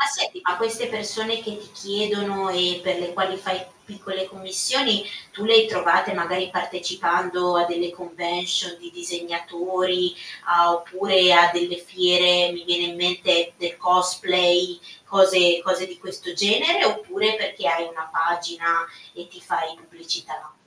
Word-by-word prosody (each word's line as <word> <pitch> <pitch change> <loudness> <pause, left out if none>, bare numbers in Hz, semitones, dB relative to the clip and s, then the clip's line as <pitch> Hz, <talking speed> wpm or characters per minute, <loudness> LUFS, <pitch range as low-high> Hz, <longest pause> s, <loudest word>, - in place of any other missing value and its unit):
Ma 280 - +4
senti, 280 +5 -2
ma 180 - +1
queste 225 +2 -3
persone 220 0 -4
che 215 -1 -8
ti 210 - -16
chiedono 200 -1 -3
e 180 -1 +1
per 185 -1 -1
le 175 0 -6
quali 190 0 -2
fai 190 -1 -4 0.2
piccole 195 -2 -7
commissioni, 205 +4 0 0.3
tu 205 - -9
le 225 +1 +4
hai 220 0 +8
trovate 180 -6 +1
magari 180 +2 -2
partecipando 180 0 -1
a 175 - +3
delle 175 0 -3
convention 175 0 -3
di 170 0 -14
disegnatori 175 +1 -3 0.3
a 170 0 +4
oppure 185 +2 +3
a 175 0 +8
delle 175 0 -2
fiere, 180 0 +4
mi 175 0 -9
viene 175 0 +1
in - - -12
mente 175 -1 +2
del 170 -1 -5
cosplay, 180 0 +2 0.3
cose 185 -3 +4
cose 185 0 -1
di 180 -1 -13
questo 185 -1 -9
genere, 220 - +3
oppure 370 - 0
perché 215 - -4
hai 165 0 +1
una 160 -1 -9
pagina 170 0 -1 0.3
e 175 0 -12
ti 180 +1 -18
fai 160 0 -4
pubblicità? 165 -3 -8
180 Hz, 150 wpm, -22 LUFS, 175-195 Hz, 0.3 s, hai